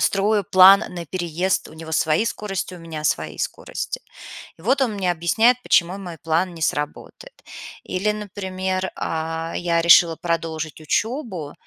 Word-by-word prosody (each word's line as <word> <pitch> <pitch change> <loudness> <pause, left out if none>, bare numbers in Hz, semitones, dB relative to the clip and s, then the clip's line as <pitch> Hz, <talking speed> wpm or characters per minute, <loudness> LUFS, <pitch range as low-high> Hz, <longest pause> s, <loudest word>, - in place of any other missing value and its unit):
строю 205 +1 +2
план 190 +2 +8
на 175 -1 -7
переезд. 180 +2 -1
У 155 - -14
него 160 0 -9
свои 155 +6 +2
скорости, 195 -4 -4
у - - -10
меня 160 -2 -7
свои 80 - -1
скорости. - - -4 0.6
И - - -16
вот 265 +6 +2
он 230 -5 0
мне 190 -3 0
объясняет, 220 +9 +3
почему 180 +3 +2
мой 175 -4 -8
план 170 +3 -1
не 165 - -8
сработает. 155 - -4 0.4
Или, 195 +3 -1
например, 190 -2 -3
а, 165 +1 -3
я 170 -1 +1
решила 170 -1 +6
продолжить 160 -2 -3
учебу, 195 - -2
175 Hz, 150 wpm, -22 LUFS, 165-195 Hz, 0.6 s, план